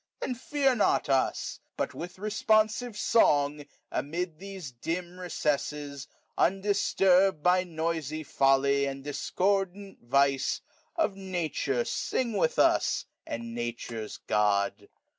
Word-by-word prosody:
^^ - - -54
Then 255 - -2
fear 270 +2 +1
not 210 - +2
us; 135 -1 0 0.2
but - - -2
with 175 +2 -7
responsive 215 +3 +1
song^ 150 -10 +3
'^ 145 - -11 0.2
Amid 165 +2 -3
these 190 -7 -7
dim 175 +9 -4
recesses, 145 -5 -2 0.3
undisturbed 195 -1 +3
^ - - -27
By 180 +1 +4
noisy 160 -2 -3
foUy 140 0 +3
and 135 0 -7
discordant 195 +6 -1
vice, 135 +2 +2
^^ - - -35 0.2
Of 320 - +1
Nature 165 -9 -2
sing 240 -3 -1
with 175 -5 +1
us, - - +3 0.2
and 115 0 -5
Nature's 120 -2 -5
Gon.. 105 -1 +2
165 Hz, 120 wpm, -29 LUFS, 140-195 Hz, 0.3 s, By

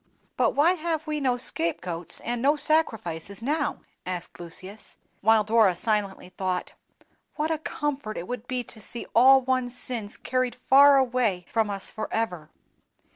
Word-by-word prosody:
'" - - -38
"But - - +1
why 315 +5 +5
have 325 -3 -2
we 305 -2 -2
no 255 -2 +1
scape 170 -9 -1
goats 175 -1 -5
and 240 0 -3
no 285 +4 +4
sacrifices 225 - -1
now?" 295 +3 -1 0.2
asked 180 -1 -6
Lucius; 185 +5 -7 0.2
while 220 +1 +4
Dora 215 -3 +4
silently 200 -1 -1
thought, 185 -1 -3 0.6
"What 310 +1 -1
a 315 - -1
comfort 285 -8 -3
it 175 - -5
would 245 -1 -6
be 255 -1 -2
to 220 -1 -11
see 235 - -6
all 265 +3 +7
one's 255 -1 -1
sins 225 -5 -2
carried 255 -1 -1
far 275 +2 +6
away 240 -8 +1
from 225 -2 0
us 195 -1 -4
forever!" 200 -8 -3
235 Hz, 160 wpm, -26 LUFS, 195-270 Hz, 0.6 s, all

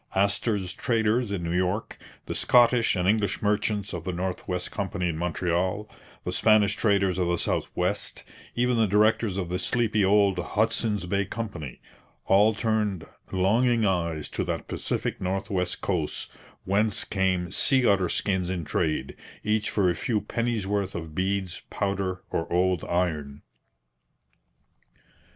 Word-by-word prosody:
Astor's 100 -1 0
traders 115 -1 +1
in 95 -4 -2
New 85 +1 -2
York, 90 +4 -1 0.3
the - - -4
Scottish 120 -2 +4
and 90 0 0
English 105 -1 +1
merchants 105 -1 0
of - - -4
the 95 - -2
North 90 +1 -4
West 90 -1 -2
Company 95 -2 -2
in 85 - -2
Montreal, 90 +4 -1 0.4
the - - -3
Spanish 110 -1 +4
traders 100 -4 +2
of 90 - +1
the 85 0 +1
South - - -1
West, - - -1 0.3
even 125 0 +2
the 110 -1 +3
directors 105 0 +2
of 90 -3 -3
the 90 +1 -2
sleepy 110 +2 +1
old 100 -1 +3
Hudson's 105 +1 +1
Bay 100 +2 0
Company 100 - -6 0.4
all 105 +3 +4
turned 105 -5 -1 0.3
longing 115 +5 +2
eyes 85 -5 -1
to - - -2
that - - -3
Pacific - - -3
north 95 +3 -2
west 90 -2 -1
coast 85 -6 -2 0.3
whence 105 +2 +2
came 95 -3 0
sea 130 +4 +3
otter 95 -4 +3
skins 95 -3 0
in 90 -4 -3
trade, 75 -4 -1 0.3
each 105 0 +1
for 100 -3 +1
a 90 - +3
few 110 +5 -1
pennies' 115 -2 -2
worth 100 -1 -1
of 80 -2 -6
beads, 95 0 -2
powder, 100 -2 -2
or 80 - -2
old 90 0 +2
iron. 75 -5 -2
95 Hz, 150 wpm, -26 LUFS, 90-105 Hz, 0.4 s, Scottish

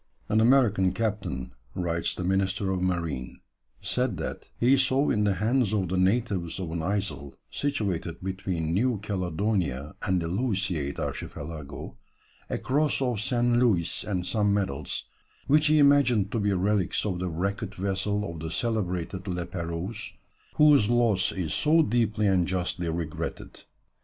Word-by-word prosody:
"An 110 +1 +3
American 110 -7 +4
captain," 100 - -3 0.2
writes 85 -2 -1
the 90 - -4
Minister 95 +1 +1
of 95 -1 -1
Marine, 85 -8 -2 0.4
"said 125 -6 0
that - - -5
he 125 +3 +5
saw 135 +1 +3
in 105 0 +2
the 100 -2 +2
hands 110 +3 +1
of 95 -4 0
the 95 - -1
natives 95 -3 +1
of 90 -4 -4
an 85 0 -2
isle 80 -7 -3 0.2
situated 95 - -2
between 95 -4 -2
New 120 +5 +2
Caledonia 90 - -1
and 95 -2 +1
the 85 - -3
Louisiade 95 - -1
Archipelago 75 -2 -6 0.5
a - - -1
cross 145 +3 +1
of 125 -6 0
St. 120 0 +2
Louis 95 -9 +2
and 90 -4 -2
some 105 -1 +1
medals, 95 -9 -2 0.4
which 150 +2 +4
he 155 +1 +4
imagined 140 -8 +4
to 115 - 0
be 105 -1 +1
relics 95 0 +1
of 95 -4 -1
the 90 0 -2
wrecked 100 +5 -3
vessel 100 +2 -1
of 85 -3 -7
the 80 +1 -4
celebrated 95 -2 -2
La 90 -1 -2
Pérouse, 85 +4 -5 0.4
whose 145 -8 +6
loss 115 -5 +3
is 90 -5 -3
so 160 +2 +4
deeply 110 -3 +1
and 95 -3 +3
justly 90 -2 -2
regretted. 80 0 -5
95 Hz, 150 wpm, -27 LUFS, 85-115 Hz, 0.5 s, whose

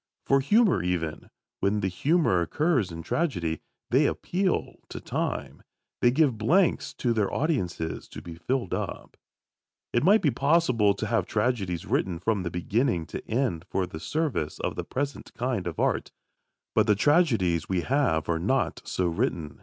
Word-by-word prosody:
For 135 - +4
humour 205 - +3
even, 85 -3 -2 0.3
when 105 +1 +1
the 95 - +1
humour 115 - +2
occurs 130 - +1
in 85 0 -7
tragedy, 90 - -1 0.3
they - - +4
appeal 185 0 -1
to - - -6
time. - - -3 0.4
They 120 - +5
give 130 -3 +2
blanks 170 - +2
to 120 -2 0
their 105 -3 0
audiences 95 - -2
to - - -9
be 85 - -9
filled 120 +4 -2
up. - - -4 0.8
It 120 - +2
might 210 +4 +5
be 145 - +4
possible 125 -7 +3
to 110 - -3
have 115 +1 0
tragedies 105 -7 -1
written 90 -3 0
from 100 +3 0
beginning 90 +2 0
to - - -4
end 110 -9 0
for 95 - 0
the 80 -3 -8
service 140 - -2
of - - -2
the - - -3
present 140 +2 -4
kind 120 -7 -2
of 85 - -5
"art." - - 0 0.6
But 110 -1 +3
the 105 - +5
tragedies 115 - +2
we 95 -2 +1
have 125 - +1
are 85 -1 0
not 130 +9 0
so 90 - -1
written. 85 -2 -2
110 Hz, 160 wpm, -27 LUFS, 90-140 Hz, 0.8 s, They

